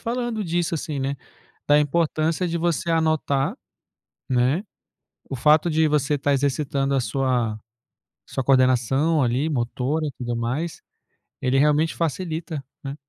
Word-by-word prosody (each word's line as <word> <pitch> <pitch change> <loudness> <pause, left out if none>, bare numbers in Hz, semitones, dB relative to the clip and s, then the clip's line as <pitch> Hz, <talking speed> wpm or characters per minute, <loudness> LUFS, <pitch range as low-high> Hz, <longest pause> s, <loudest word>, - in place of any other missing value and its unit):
falando 240 -2 -2
disso 175 0 -1
assim, 155 -3 -3
né, 135 +1 -2 0.5
da 145 0 +5
importância 160 +3 0
de 170 0 -2
você 170 0 0
anotar, 155 -4 +1 0.7
né, 130 +8 +2 0.7
o - - -3
fato 150 +6 +4
de 160 0 +3
você 150 -1 +1
tá 140 +1 +1
exercitando 140 0 0
a - - +3
sua 120 -2 0 0.7
sua 130 - -3
coordenação, 135 +4 +3
ali, 130 +5 +1
motora 130 +3 -1
e - - -2
tudo 120 -1 -3
mais, 130 +9 -3 0.6
ele 130 +1 +1
realmente 150 +2 +3
facilita, 165 -2 -3 0.2
né. 140 0 -5
145 Hz, 135 wpm, -23 LUFS, 130-160 Hz, 0.7 s, da